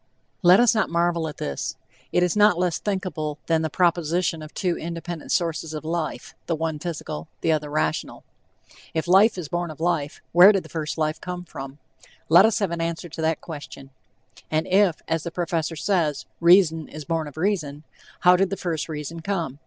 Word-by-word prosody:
Let 180 +1 +7
us 240 -2 +5
not 220 -3 +1
marvel 170 -1 +1
at 150 - -7
this; 70 -1 -4 0.4
it 180 - +3
is 180 +1 +1
not 210 -3 +5
less 180 -1 0
thinkable 180 -7 -3
than 165 -1 +2
the 160 - -1
proposition 170 0 +1
of 155 0 -9
two 180 -4 -1
independent 170 0 -6
sources 165 -2 -1
of 155 - -6
life, 155 -6 -3
the 165 - 0
one 160 -1 -3
physical, 150 - -5
the 165 - +2
other 150 -1 0
rational. 150 - -2 0.7
If 160 +1 -1
"life 195 +4 +5
is 175 -4 -5
born 175 +2 -2
of 155 - -10
life," 160 -4 -1
where 180 +4 +9
did 195 - 0
the - - -13
first 155 -1 -4
life 155 0 -1
come 180 -1 -6
from? 135 -3 -8 0.5
Let 170 +5 +8
us 225 - 0
have 200 -5 -1
an 170 -1 -2
answer 170 +1 -3
to 160 - -7
that 160 0 0
question. 145 -4 -9 0.6
And 155 +1 0
if, 190 -3 +2
as 165 - 0
the 170 - -5
professor 165 -1 -2
says, 160 -3 0
"reason 170 -3 +5
is 155 -1 -9
born 165 -1 -1
of 145 - -12
reason," 160 -6 -1 0.4
how 180 0 +7
did 190 +1 +2
the 195 - -3
first 165 -3 -3
reason 155 +2 -5
come? 165 -6 -3
165 Hz, 195 wpm, -24 LUFS, 155-180 Hz, 0.7 s, where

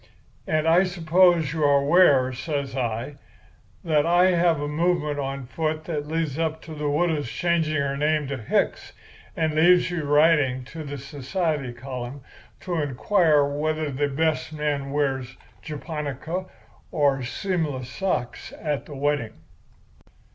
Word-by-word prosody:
And 155 0 +1
I 170 +3 +5
suppose 175 -3 +3
you 160 -2 -1
are 145 -1 +5
aware,' 140 -5 +5
says 140 0 -3
I, 120 +2 -3 0.7
'that 155 -3 +2
I 175 +3 +4
have 170 -3 +2
a 145 - -2
movement 150 -1 0
on 135 -1 -4
foot 155 +4 -2
that 150 -3 -4
leads 160 -2 -2
up 160 -1 -1
to 160 - -9
the 150 -1 -2
widow's 150 -3 0
changing 165 -1 0
her 140 0 -1
name 150 +1 +1
to 140 - -3
Hicks, 110 - -1 0.4
and 160 -2 0
leaves 175 +3 +4
you 170 -3 -2
writing 145 -3 +3
to 155 +5 -8
the 145 -1 -6
society 140 +1 -3
column 125 +2 -7 0.4
to 175 -4 -2
inquire 150 +2 +2
whether 155 +1 -2
the 145 +2 0
best 155 +3 -1
man 145 -2 -2
wears 135 -3 -1
a - - -21 0.3
japonica 155 +3 -5 0.4
or 140 -4 +2
seamless 145 -1 -2
socks 130 -4 -3
at 150 -3 -3
the 145 - -8
wedding! 140 -5 -1
150 Hz, 145 wpm, -24 LUFS, 140-165 Hz, 0.7 s, I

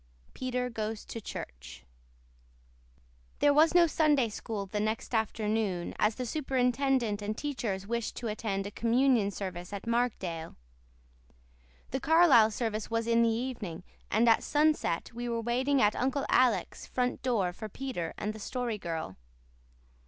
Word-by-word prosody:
PETER 250 -1 -2
GOES 220 -1 -4
TO 230 - -7
CHURCH - - -8 1.5
There 290 - +4
was 315 +3 +5
no 350 -1 +7
Sunday 295 -6 +2
School 210 -1 -5
the 210 +2 -3
next 220 +3 -2
afternoon, 215 -4 -1
as 210 0 +2
superintendent 255 -4 +1
and 210 +1 -3
teachers 230 -10 -3
wished 235 +1 -3
to 245 - -6
attend 210 -2 -2
a 200 - -5
communion 235 -1 +2
service 185 -3 -6
at 200 -1 -6
Markdale. 210 -9 -1 1.4
The 265 - -1
Carlisle 310 -8 +6
service 220 -1 -3
was 230 0 0
in 230 0 +3
the 230 - +4
evening, 225 -8 -3 0.3
and 225 +3 +3
at 225 - +5
sunset 300 - +1
we 240 +1 -4
were 230 -1 -1
waiting 255 +4 +1
at 210 0 +3
Uncle 270 +2 0
Alec's 250 -2 +2
front 250 -1 -1
door 215 -9 0
for 215 +3 -7
Peter 210 -9 -4
and 210 +1 -3
the 220 - -10
Story 240 0 -3
Girl. 160 - -5
230 Hz, 145 wpm, -30 LUFS, 205-255 Hz, 1.5 s, no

